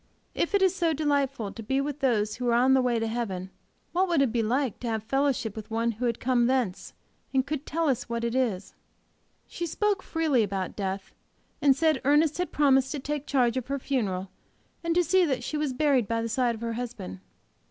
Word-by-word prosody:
If 375 - 0
it 395 - +3
is 375 - +4
so 340 -4 +1
delightful 280 -7 0
to 230 - -8
be 265 +5 0
with 285 +1 -3
those 215 -6 +1
who 245 -1 -1
are - - +3
on 255 +2 +4
the 265 - +5
way 245 -2 +1
to 225 - 0
heaven, 200 -5 -3 0.4
what 370 +2 +2
would 340 -4 +2
it 255 - +1
be 235 0 +1
to 245 +2 0
have 225 -3 -2
fellowship 270 -3 0
with 220 0 -8
one 230 +1 0
who 230 +3 -4
had 235 -2 0
come 245 -1 +2
thence, 245 -8 -1 0.4
and 265 -1 +2
could 290 0 -4
tell 330 +2 0
us 255 -3 0
what 235 0 -2
it 235 0 -1
is! 225 -8 -1 0.7
She 345 - -4
spoke 410 +3 0
freely 315 -7 +1
about 195 -3 -2
death, 195 -1 -4 0.5
and 275 -2 +5
said 315 +2 +2
Ernest 295 +3 +3
had 360 - -1
promised 270 -3 +3
to 295 - -3
take 290 +1 -4
charge 255 -3 +2
of 255 - -3
her 280 +1 -1
funeral, 200 -9 -2 0.5
and 335 0 0
to 355 - +4
see 370 +3 +3
that 265 -7 0
she 305 - -4
was 300 -2 0
buried 260 -4 +2
by 230 +1 -1
the 230 - -3
side 240 0 +1
of 220 - -11
her 230 -1 -2
husband. 225 - -6
255 Hz, 220 wpm, -27 LUFS, 230-290 Hz, 0.7 s, the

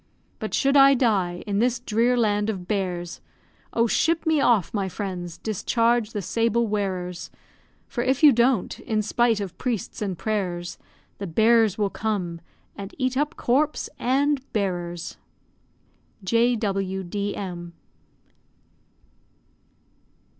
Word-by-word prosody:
But - - -3
should 275 0 +2
I 275 0 +7
die 195 -8 +1
in 200 -1 -1
this 240 +1 +1
drear 240 +1 +1
land 210 -2 +1
of 185 -4 -4
bears, 180 -4 -3 0.5
Oh! 230 - +2
ship 325 +8 +1
me 315 -3 +3
off, 230 -9 +2
my 200 -3 -1
friends, 180 -3 -5
discharge 230 +1 +1
the 205 -3 -3
sable 230 +4 +1
wearers, 185 -4 -3 0.6
For 240 - -3
if 265 +4 0
you 300 - +10
don't, 235 -3 +1
in 215 -1 -1
spite 230 +1 +2
of 190 -3 -5
priests 235 -6 -3
and 195 -4 -2
prayers, 180 -5 -3 0.4
The 200 - -4
bear 225 +6 +4
will 205 -2 0
come, 185 -6 -3 0.3
and 200 0 -8
eat 255 -1 0
up 295 +4 0
corpse 285 +5 0
and 275 +3 +1
bearers. 175 -4 -3 1.1
J.W.D.M. 195 -4 -1
215 Hz, 120 wpm, -24 LUFS, 190-240 Hz, 1.1 s, you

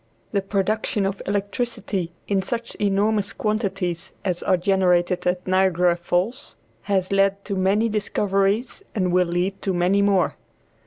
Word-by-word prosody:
The 200 - +1
production 200 +1 0
of 195 0 -2
electricity 200 -2 -2 0.2
in 195 -1 +1
such 235 +4 -4
enormous 205 +1 +1
quantities 195 -5 -2
as 180 -2 -1
are 185 - +2
generated 180 -1 +2
at 180 0 0
Niagara 185 -2 +3
Falls 180 +10 -2 0.3
has 190 -2 +1
led 195 0 +2
to 200 - -3
many 195 +4 +2
discoveries 205 - 0
and 185 -4 +1
will 180 0 +3
lead 180 +3 -1
to 190 -2 -1
many 180 +3 +3
more. 200 -3 +2
195 Hz, 140 wpm, -23 LUFS, 180-205 Hz, 0.3 s, Niagara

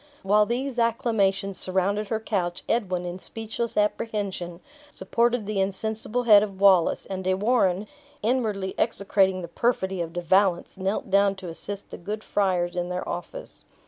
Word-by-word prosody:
While 210 +2 +4
these 250 +1 -2
acclamations 200 -4 +1
surrounded 195 +3 0
her 220 +1 -1
couch, 185 -6 -2
Edwin, 185 -6 0
in 175 +1 -5
speechless 225 +3 -5
apprehension, 205 -5 -1 0.3
supported 235 0 0
the 210 -1 -2
insensible 220 +5 -2
head 210 -4 +8
of 200 -2 -4
Wallace; 190 -4 +4
and 190 -1 -5
De 185 0 +1
Warenne, 200 -2 +2 0.4
inwardly 215 -5 0
execrating 195 -4 +2
the - - -5
perfidy 190 -1 0
of 165 -1 -4
De 175 - -3
Valence, 185 0 +2
knelt 190 +2 -2
down 200 0 +4
to 190 -2 -8
assist 200 +4 -6
the - - -8
good 210 +5 -5
friars 180 -4 0
in 175 0 -2
their 180 0 -3
office. - - -7
195 Hz, 155 wpm, -25 LUFS, 185-220 Hz, 0.4 s, head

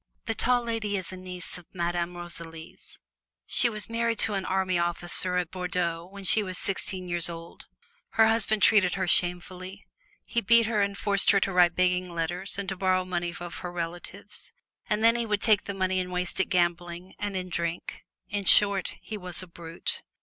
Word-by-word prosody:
The 225 - -1
Tall 245 +2 +1
Lady 225 -3 -2
is 185 -1 -4
a - - -5
niece 180 -1 -8
of 175 - -19
Madame 175 0 -2
Rosalie's. 165 -2 -8 0.5
She 240 - +3
was 215 -3 0
married 230 0 -1
to 225 - +1
an 195 -2 -2
army 185 -2 0
officer 175 +1 +1
at 180 -2 -2
Bordeaux 180 -2 -3
when 200 0 -10
she 215 +3 +3
was 185 -3 -5
sixteen 190 -1 +1
years 175 -1 0
old. 165 0 -10 0.5
Her 225 0 +5
husband 220 -2 +1
treated 190 -5 +4
her 190 -2 -2
shamefully; 180 +2 -1 0.4
he 235 - -1
beat 230 +2 +4
her 215 -2 0
and 200 0 -1
forced 200 -1 +3
her 200 - +5
to 195 - -1
write 175 -1 +4
begging 180 0 +1
letters 175 +4 -2
and 200 -1 -4
to 190 - -2
borrow 185 0 +1
money 175 -1 -2
of 175 -1 -7
her 180 -1 -6
relatives, 175 0 -6 0.4
and 210 +1 0
then 230 +1 +5
he 235 -1 -1
would 210 -1 0
take 215 -3 +4
this 200 -1 -5
money 185 0 0
and 180 0 -4
waste 180 0 -2
it 190 - +3
gambling 175 0 -1
and 205 -1 -4
in 185 -1 -4
drink. 170 0 -4 0.2
In 200 -1 -4
short, 200 -2 +6
he 215 - -6
was 180 -1 +5
a - - -11
Brute. 170 -1 -3
185 Hz, 195 wpm, -27 LUFS, 175-200 Hz, 0.5 s, short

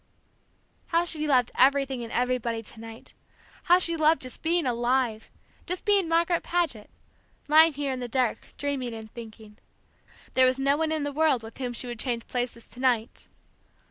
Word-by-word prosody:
How 335 +1 +1
she 310 -3 0
loved 250 -4 +3
everything 270 -1 +2
and 230 - -8
everybody 245 -2 -1
to 220 - -10
night, 225 0 -10 0.5
how 355 - +6
she 335 -2 0
loved 315 -2 +3
just 255 - -6
being 335 -1 +1
alive 240 -2 0 0.4
just 360 +1 -4
being 400 -4 +3
Margaret 335 +1 +2
Paget, 320 -12 -2 0.6
lying 315 +2 +6
here 285 -1 -2
in 260 - -3
the 245 - -4
dark 245 -1 -1
dreaming 265 -5 -3
and 220 -1 -10
thinking. 220 -2 -11 0.7
There 260 0 +6
was 255 +1 +1
no 275 +1 +2
one 315 +1 -1
in 310 -2 -1
the 290 0 -3
world 300 -5 +2
with 225 +3 -11
whom 250 -2 -3
she 240 - 0
would 240 -2 -6
change 235 -2 -2
places 245 -2 -4
to 245 - -8
night! 245 -3 0
260 Hz, 175 wpm, -26 LUFS, 235-310 Hz, 0.7 s, how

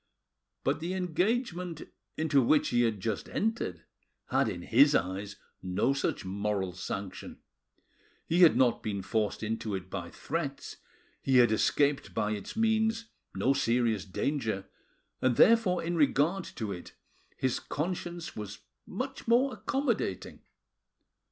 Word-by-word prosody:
But 140 +3 +1
the 175 +3 -3
engagement 180 - -1 0.3
into 155 -3 +3
which 145 +5 +3
he 120 0 +2
had 115 -4 +1
just 110 0 -3
entered 205 - -2 0.5
had - - +3
in - - -5
his - - +5
eyes 95 +3 -1 0.3
no 95 +8 +1
such 140 - -2
moral 100 -1 -2
sanction; 95 +1 -6 0.9
he 170 - +1
had 170 - +7
not 125 -3 +3
been 100 -3 -3
forced 110 +1 -1
into 110 -1 -2
it 95 -1 -7
by 90 -3 -4
threats, 145 -3 -4 0.4
he 130 -1 +3
had 120 -2 +6
escaped 135 -2 +1
by 105 - 0
its 105 -2 -5
means 225 0 +1 0.3
no 135 - +2
serious 115 -6 +1
danger, 110 -1 -2 0.6
and 130 -2 +2
therefore 210 - +5
in 170 +1 -1
regard 155 +4 +2
to 110 -3 -5
it 90 -2 -8 0.4
his 130 -2 0
conscience 170 +1 -4
was 105 -1 -7 0.3
much - - -5
more 250 +3 +4
accommodating. 235 - -2
130 Hz, 130 wpm, -30 LUFS, -, 0.9 s, had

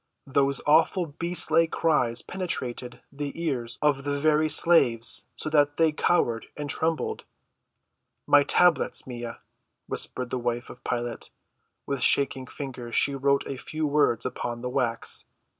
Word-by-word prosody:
Those 140 0 +1
awful 160 +1 +3
beast‐like 165 0 +1
cries 125 -9 +1
penetrated 125 -9 -4
the 145 +2 -6
ears 125 -7 -2
of 145 -2 +2
the 145 0 -2
very 155 +1 +3
slaves 130 -7 +3
so - - -4
that 145 -1 +3
they 160 -1 +4
cowered 120 -7 +1
and 145 -1 -4
trembled. 160 0 -1 1.0
"My 145 - +6
tablets, 175 +3 +2
Maia," 120 -2 -6 0.5
whispered 125 -1 -2
the 130 - -1
wife 120 0 -3
of - - -15
Pilate. 120 -1 -3 0.6
With 140 -2 -3
shaking 135 -1 +2
fingers 125 -5 -7
she 140 - +3
wrote 140 +1 +1
a 135 - -5
few 155 +2 -3
words 145 -5 +2
upon 120 -1 -4
the 125 - -2
wax. 125 -4 -1
140 Hz, 140 wpm, -26 LUFS, 125-155 Hz, 1.0 s, My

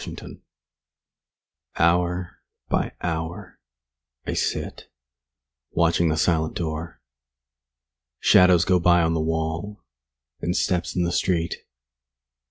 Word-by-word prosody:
LXXVII - - -9 1.4
Hour 90 +1 +1 0.3
by - - 0
hour 80 0 -4 0.7
I - - -2
sit, - - -3 0.8
Watching 85 0 +2
the 80 - 0
silent 80 -1 +1
door. 80 -2 -4 1.2
Shadows 90 -2 +5
go 90 -1 +3
by 85 0 +4
on 80 0 +1
the 80 - 0
wall, 80 +5 -3 0.6
And 90 - -1
steps 90 -1 -1
in 90 - +1
the 85 - -1
street. 85 -2 0
85 Hz, 100 wpm, -24 LUFS, 80-90 Hz, 1.4 s, Shadows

